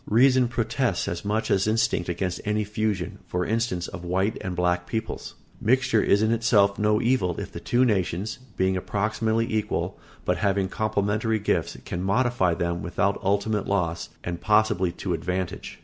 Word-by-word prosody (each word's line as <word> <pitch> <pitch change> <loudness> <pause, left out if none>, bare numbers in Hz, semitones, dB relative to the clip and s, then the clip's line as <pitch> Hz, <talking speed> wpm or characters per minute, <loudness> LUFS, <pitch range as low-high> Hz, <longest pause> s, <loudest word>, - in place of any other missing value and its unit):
Reason 125 +3 +5
protests 120 -2 -1
as 85 0 -3
much 105 +2 -1
as 95 +1 +2
instinct 110 -5 +1
against 90 +1 -2
any 105 +1 0
fusion, 105 -3 -2
for 90 0 -1
instance, 110 -6 -1
of 85 - -8
white 95 +4 0
and 95 -3 -4
black 90 0 0
peoples. 110 -1 -4 0.3
Mixture 115 -2 +3
is 100 +2 +3
in 110 - +2
itself 105 -4 +3
no 105 0 +3
evil 115 -8 +1
if - - -6
the - - -7
two 125 +2 +2
nations, 95 -1 -1 0.2
being 95 0 +2
approximately 110 +4 0
equal, 110 -1 -1 0.3
but - - +1
having 100 -2 +1
complementary 110 +1 0
gifts, 105 - -1
can 90 - -3
modify 100 -2 +2
them 85 0 -2
without 100 +4 0
ultimate 100 +1 0
loss, 85 -4 -1
and 85 0 -4
possibly 105 -4 +3
to 90 0 -3
advantage. 90 +2 -3
100 Hz, 165 wpm, -25 LUFS, 90-110 Hz, 0.3 s, Reason